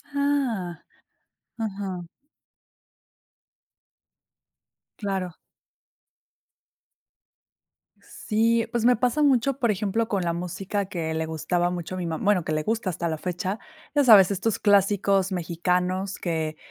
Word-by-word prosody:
Ah. 255 - 0 0.8
Ajá. 195 -5 -4 2.9
Claro. 190 -4 -3 2.7
Sí, 230 +1 0
pues, 240 -2 -1
me 245 +1 +5
pasa 250 +5 +1
mucho, 270 -1 +3
por 240 -5 +2
ejemplo, 210 +3 -1
con 195 -3 0
la 170 - 0
música 185 +3 -3
que 165 -4 -3
le 160 0 -1
gustaba 175 +2 -1
mucho 175 +1 -5
a - - -5
mi 180 - -3
ma 160 -1 -2
bueno, 200 -4 +2
que 155 - -4
le 155 0 0
gusta 225 -1 -1
hasta 170 -1 -2
la 160 -1 -2
fecha. 185 +4 -3 0.4
Ya 290 - +5
sabes, 205 -6 +8
estos 210 +3 -1
clásicos 200 -1 +3
mexicanos 180 +2 -1
que 160 -3 -2
195 Hz, 120 wpm, -25 LUFS, 175-220 Hz, 2.9 s, sabes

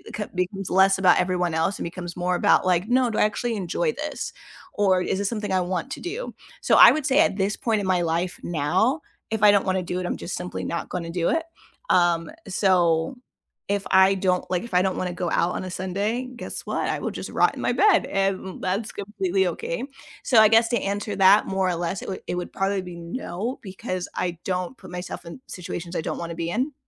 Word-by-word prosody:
c 210 - -2
becomes 180 +1 -2
less 190 +1 +4
about 185 -2 +5
everyone 180 -2 0
else 165 +5 0
and - - -3
becomes 175 0 -6
more 180 0 0
about - - +3
like, 180 +1 +2
"No, 250 0 +3
do 220 - -3
I - - +5
actually 230 +2 -1
enjoy 200 - -1
this?" - - -5 0.4
Or 190 -3 +3
"Is 190 - -1
this 200 0 0
something 210 -3 -3
I 185 -1 +2
want 180 +8 -3
to - - -5
do?" 420 +8 -5 0.3
So, - - +3
I - - +10
would 310 -3 -1
say 270 +2 +3
at 315 -11 +4
this 200 +1 0
point 220 -3 0
in 190 - -3
my 180 -2 +2
life 170 +2 -1
now, 185 - +1 0.3
if 220 -1 -1
I 210 - +9
don't 200 -1 +3
wanna 185 -1 0
do 180 +1 -3
it, 180 - -3
I'm - - -2
just 175 - -5
simply 180 0 -5
not 170 - -3
gonna 170 -2 -4
do 170 -1 0
it, 325 - +1 0.5
um, 170 -2 +3 0.2
so, 180 +3 +2 0.6
if 200 - -10
I 190 +1 +6
don't 185 -1 0
like 180 +2 0
if 235 - -10
I 180 - +5
don't 190 -1 0
wanna 180 -1 -2
go 180 -1 -2
out 175 - +1
on - - -3
a 185 - -5
Sunday, 200 +7 -2
guess - - -7
what? - - -2
I - - 0
will - - -3
just - - -6
rot - - +3
in - - -6
my - - +1
bed, 410 -5 +4
and 195 -1 -1
that's 200 +4 -1
completely 195 -2 -1
okay, 170 +4 -3 0.4
so, 240 - +5
I 220 - +8
guess 225 +1 +5
to 235 - +1
answer 205 +1 -2
that 195 +2 +6
more 190 -1 0
or 180 - 0
less, 175 +2 -3
it - - -6
would 190 - -5
it - - -2
would 180 0 -4
probably 195 0 0
be 180 -1 -8
no, 180 +5 -5
because 185 -2 -5
I 175 -2 -2
don't 185 +6 -2
put - - -13
myself 180 0 -6
in 170 +8 -9
situations 175 -1 -6
I - - 0
don't - - -4
wanna 170 0 -5
be 165 0 -3
in, 260 +9 -1
190 Hz, 235 wpm, -24 LUFS, 180-210 Hz, 0.6 s, I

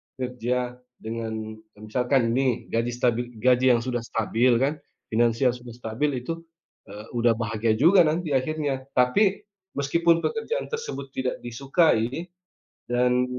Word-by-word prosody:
kerja 125 0 -3 0.2
dengan 110 -1 -5 0.2
misalkan 120 +3 +1
ini 130 -3 0
gaji 115 +1 0
stabil 120 0 -1
gaji 125 +2 +4
yang - - +1
sudah 125 -1 -1
stabil 115 +2 +1
kan, 140 +2 +2 0.4
finansial 115 +3 +3
sudah 125 -1 -11
stabil 120 +5 -2
itu, 165 +4 -5 0.5
eee, 105 +2 -9
udah 120 0 +3
bahagia 115 -1 0
juga 175 +6 +7
nanti 160 +1 -1
akhirnya. 140 0 -1
Tapi 190 +11 +3 0.3
meskipun 165 +4 +2
pekerjaan 465 +2 -2
tersebut 455 - -5
tidak 130 -1 -1
disukai 135 +3 +1 0.6
dan 125 +1 +2
125 Hz, 125 wpm, -25 LUFS, 115-140 Hz, 0.6 s, juga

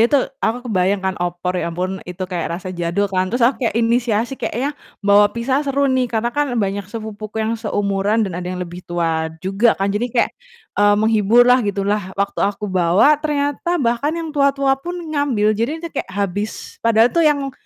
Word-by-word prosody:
itu 290 - +4 0.2
aku 245 +3 -1
kebayang 190 -3 0
kan 190 - +1
opor 175 +1 -2
ya - - -2
ampun 185 +3 -3
itu 180 +1 -4
kayak 175 -2 -3
rasa 185 0 -7
jadul 175 +3 -1
kan, 185 0 +1
terus 240 +3 +1
aku 255 +4 +2
kayak - - -5
inisiasi 235 +1 +1
kayaknya 270 +6 -2 0.3
bawa 205 0 +6
pizza 260 +5 -1
seru 280 -1 0
nih, 255 -1 +1
karena 235 +1 -1
kan 285 -2 -1
banyak 200 -2 -1
sepupuku 215 -1 -7
yang 220 - 0
seumuran 205 0 0
dan 190 - -4
ada 180 - -5
yang 180 0 -4
lebih 175 +1 -9
tua 165 -2 0 0.2
juga 195 +5 +2
kan 195 +1 0
jadi 235 +4 -1
kayak, 240 0 +1 0.5
eee, 205 0 +5
menghibur 220 +2 +4
lah 250 +1 +5
gitu 200 -3 -2
lah 200 -2 -2
waktu 200 0 -1
aku 200 +1 0
bawa 185 - +4
ternyata 295 +3 -1
bahkan 280 +3 0
yang 325 -2 -4
tua-tua 275 -1 +2
pun 350 +4 -5 0.2
ngambil. 250 -8 +2
Jadi 285 +10 -2
itu - - -3
kayak 275 - -4
habis 200 +2 -4
padahal 230 +1 +4
tuh 335 - +2
yang, 280 -2 -1
215 Hz, 195 wpm, -19 LUFS, 195-250 Hz, 0.5 s, bawa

